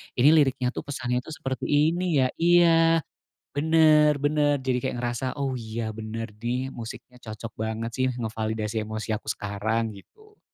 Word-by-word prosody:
ini 140 +5 +6
liriknya 135 -5 +3
tuh - - -5
pesannya 125 -3 -2
tuh 160 - -10
seperti 135 -5 -4
ini 160 +2 +2
ya - - +3
iya, 165 -1 +5 0.6
bener 150 -1 +5
bener, 145 0 +2
jadi 130 -1 +1
kayak - - -2
ngerasa, 120 +1 -2
oh, 135 -1 -1
iya, 110 0 -4
bener 110 0 -6
nih 125 +3 -2
musiknya 120 +2 -9
cocok 110 0 -8
banget 110 +1 -3
sih 130 - +2
ngevalidasi 110 -1 -2
emosi 110 +1 -5
aku 105 - -9
sekarang 110 +2 -2
gitu. 425 - -19
125 Hz, 155 wpm, -26 LUFS, 110-150 Hz, 0.6 s, ini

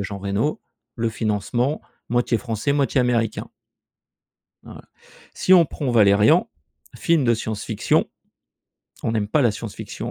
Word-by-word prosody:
a - - -1
Jean 100 0 -6
Reno, 100 +9 -2 0.4
le 115 0 0
financement, 115 +5 -1 0.3
moitié 120 0 +1
français, 115 +4 -2
moitié 140 -1 +1
américain. 115 -3 -1 1.1
Voila. - - -12 0.5
Si 185 - +2
on 175 -2 +8
prend 145 -3 -4
«Valérian», 105 - +4 0.5
film 165 -5 +1
de 115 -1 +3
science 110 -1 -5
fiction, 110 - 0 0.9
on 115 - -1
n'aime 105 -2 -1
pas 145 +4 +2
la 120 - +4
science 105 0 -7
fiction - - -7
115 Hz, 145 wpm, -22 LUFS, 105-135 Hz, 1.1 s, on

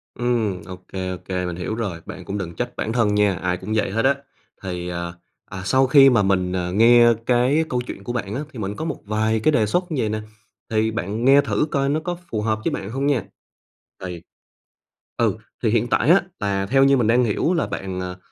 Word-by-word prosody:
Ừm, 115 -6 -1
ô 90 - -7 0.2
kê, 95 -1 -3
ô - - -4
kê, 90 -1 -2
mình 90 -1 -4
hiểu 90 +4 -3
rồi, 100 -8 -4
bạn - - -8
cũng 100 +1 -4
đừng 85 -3 -5
trách 120 0 -4
bản 110 - -2
thân 115 -4 +2
nha, 105 -1 +3
ai 90 -1 -1
cũng 95 +4 -6
vậy 105 - +1
hết 115 +4 0
á. 140 - +5 0.5
Thì, 90 -2 -4
à, 85 0 -4 0.3
à, 95 - -7
sau 130 +6 +3
khi 135 0 +7
mà 115 -4 +3
mình, 95 -2 +1
à, 90 -1 -2
nghe 120 +4 +6 0.2
cái 130 +6 +3
câu 125 -1 -1
chuyện 100 - -8
của 120 - -3
bạn 105 -5 -3
á, 140 - -2
thì 125 - -10
mình 100 -1 -3
có - - -4
một - - -3
vài 110 +1 0
cái 155 - +3
đề 110 -7 +3
xuất 175 - -1
như 135 - 0
vầy 110 - 0
nè, 110 +1 -2 0.5
thì 110 0 +1
bạn 110 +1 -3
nghe 140 +2 +7
thử 145 +1 0
coi 140 -1 +1
nó 150 +3 +1
có 175 +2 -4
phù 110 -2 -2
hợp 110 0 0
với - - +1
bạn 95 - -4
hông 135 +4 -2
nha. 140 -5 +1 0.8
Thì 90 -2 -6 1.0
ừ, - - +1 0.3
thì - - +3
hiện 115 +1 +1
tại 120 +3 +1
á, 180 +4 +7 0.2
là 100 -1 -1
theo 135 +6 +3
như 135 0 +5
mình 120 -4 +1
đang 120 +2 +4
hiểu 120 - +1
là 170 - 0
bạn, 95 -1 -5
ờ, 90 0 -5
110 Hz, 240 wpm, -22 LUFS, 95-125 Hz, 1.0 s, khi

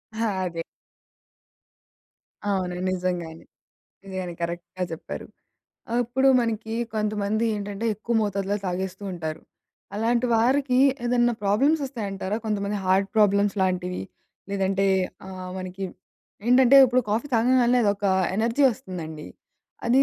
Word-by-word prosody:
ఆ! - - -6 0.3
అదే. 170 -2 -3 1.8
అవును. 190 -3 0 0.2
నిజంగానే, 175 -3 -3 0.6
నిజంగానే 185 -2 -5
కరెక్ట్‌గా 170 +1 -4
చెప్పారు. 160 - -6 0.7
అప్పుడు 250 +3 +2
మనకి 225 -1 -2 0.2
కొంతమంది 215 0 0
ఏంటంటే 205 +1 -4
ఎక్కువ 225 +3 -3
మోతాదులో 200 0 -1
తాగేస్తూ 185 +2 -3
ఉంటారు. 160 -3 -5 0.5
అలాంటి 235 +3 +1
వారికి 255 +3 +3 0.3
ఏదన్నా 240 0 +3
ప్రాబ్లమ్స్ 270 +11 +3
వస్తాయంటారా? 205 -6 -3
కొంతమంది 205 -1 -1
హార్ట్ 190 +1 +3
ప్రాబ్లమ్స్ 205 -1 +3
లాంటివి? 180 -1 -1 0.5
లేదంటే 195 0 +1 0.4
ఆహ్, 185 -1 -7
మనకి 185 +1 -5 0.6
ఏంటంటే 255 +1 +6
ఇప్పుడు 255 0 +3
కాఫీ 225 +7 0
తాగంగాల్నే 245 +1 +4
అదొక 205 0 0 0.3
ఎనర్జీ 230 +6 +1
వస్తుందండి. 165 -7 -7 0.6
అది 255 +3 +5
205 Hz, 105 wpm, -25 LUFS, 185-235 Hz, 1.8 s, ఏంటంటే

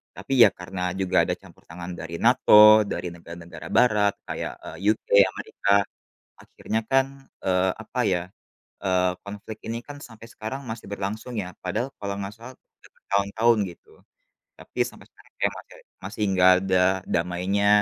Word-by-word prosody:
Tapi 135 - -5
ya 110 - +7
karena 90 +1 -6
juga 95 -2 +2
ada - - 0
campur - - -18
tangan 85 +2 -8
dari 80 +1 -6
NATO, 110 -3 +7
dari 90 - -4
negara-negara 85 -1 -10
barat 105 -2 +3
kayak, - - -4
eee, - - -8 0.2
UK, - - -34 0.2
Amerika, 100 +1 -3 0.7
akhirnya 110 - -4
kan, 135 0 +4 0.4
eee, 95 0 +2
apa 120 - -8
ya, 90 -3 +1 0.6
eee, 90 -1 +2
konflik 105 +2 -9
ini 115 +1 -3
kan 145 0 -9
sampai 115 -3 -12
sekarang 120 +6 -6
masih 110 -3 -7
berlangsung 100 +4 -5
ya, 90 -4 -4
padahal 95 +8 -2
kalau 100 -1 -3
nggak 100 0 -5
salah, 115 +3 -12
udah - - -25
bertahun-tahun 105 +3 +1
gitu. 85 - -17 0.7
Tapi - - -13
sampai - - -11
sekarang - - -23
kayak - - +2
masih - - -13 0.3
masih 105 +3 -5
enggak 95 -1 +5
ada 95 -1 0 0.3
damainya, 90 +4 0
100 Hz, 155 wpm, -25 LUFS, 90-110 Hz, 0.7 s, ya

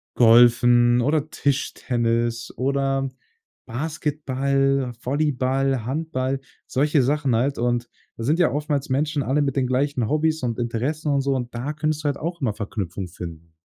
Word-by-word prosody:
Golfen 120 +1 +6
oder 150 +4 +1
Tischtennis 120 -5 -1
oder 135 0 0 0.6
Basketball, 135 -1 -1
Volleyball, 135 -2 0
Handball, 135 -1 -2 0.3
solche 145 +1 +2
Sachen 140 -2 +1
halt. 135 +5 0
Und 120 0 0 0.3
da 115 - -5
sind 150 +8 +1
ja 170 -7 +4
oftmals 145 0 -2
Menschen 145 +3 0
alle 140 +3 +1
mit 140 -2 0
den 130 -2 +1
gleichen 130 -2 0
Hobbys 155 +1 +1
und 120 -1 -2
Interessen 135 +6 -1
und 140 - +2
so, 135 0 0
und 125 -2 -4
da 130 +6 -3
könntest 155 0 -2
du - - -12
halt 140 -1 0
auch 170 +2 -5
immer 120 -6 0
Verknüpfung 100 -3 -4
finden. 85 -2 -9
135 Hz, 150 wpm, -23 LUFS, 120-145 Hz, 0.6 s, Golfen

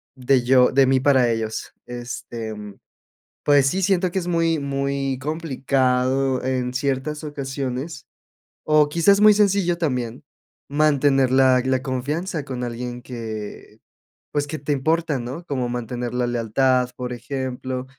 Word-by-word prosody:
de 130 -1 +2
yo 125 0 +5
de 135 0 +5
mí 130 0 +3
para 130 -3 +3
ellos. 110 -1 -3
Este, 120 -2 -6
mm, 105 -1 -9 0.7
pues 145 -2 +5
sí, 190 +8 0
siento 185 -1 +2
que 190 - -1
es 175 - -6
muy 165 -2 +1
muy 140 -1 -2
complicado 135 -3 0
en 130 -1 -1
ciertas 140 +2 -2
ocasiones, 135 -1 -5 0.6
o 150 -1 +4
quizás 170 +6 +3
muy 210 0 +8
sencillo 200 -4 +2
también, 125 -6 -2 0.4
mantener 140 -3 +3
la 130 -1 +5
la 130 0 +1
confianza 150 +5 -3
con 130 -3 -4
alguien 120 +1 -5
que, 110 -4 -7 0.5
pues, 145 -1 -1
que 155 +1 -5
te 145 +2 -3
importa, 155 +1 0
¿no? 130 +8 -6
Cómo 130 -6 -2
mantener 120 0 -4
la 125 0 0
lealtad, 125 +2 +1
por 125 0 -5
ejemplo, 130 0 -4
135 Hz, 140 wpm, -22 LUFS, 125-150 Hz, 0.7 s, muy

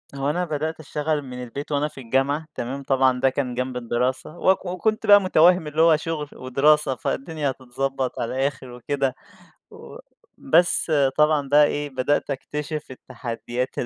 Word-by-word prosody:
هو 140 +1 -1
أنا 175 +4 0
بدأت 155 0 -3
اشتغل 150 0 -2
من 125 -2 -8
البيت 140 +5 -7
وأنا 145 +1 +1
في 135 - -11
الجامعة، 135 +5 0
تمام؟ 135 +3 -5
طبعًا 130 -1 +2
ده 135 - +3
كان 130 -1 -3
جنب 125 0 -3
الدراسة، 125 +6 -2
وك 190 +2 +2
وكنت 185 +5 -1
بقى 205 0 +8
مُتوهِّم 180 -2 +4
اللي 150 +2 0
هو 165 -1 +6
شغل 155 -2 -4
ودراسة، 135 +2 +2
فالدنيا 145 +4 -3
هتتضبّط 130 +1 -4
على 120 - -3
الآخر 135 -1 -2
وكده 135 +2 -2 0.6
و - - -12 0.4
بس 170 +2 +3 0.3
طبعًا 150 -2 +3
بقى 145 +1 +6
إيه، 145 0 -2
بدأت 135 +3 -1
أكتشف 150 +2 -5
التحديات 125 -1 -5
140 Hz, 155 wpm, -23 LUFS, 130-155 Hz, 0.6 s, بقى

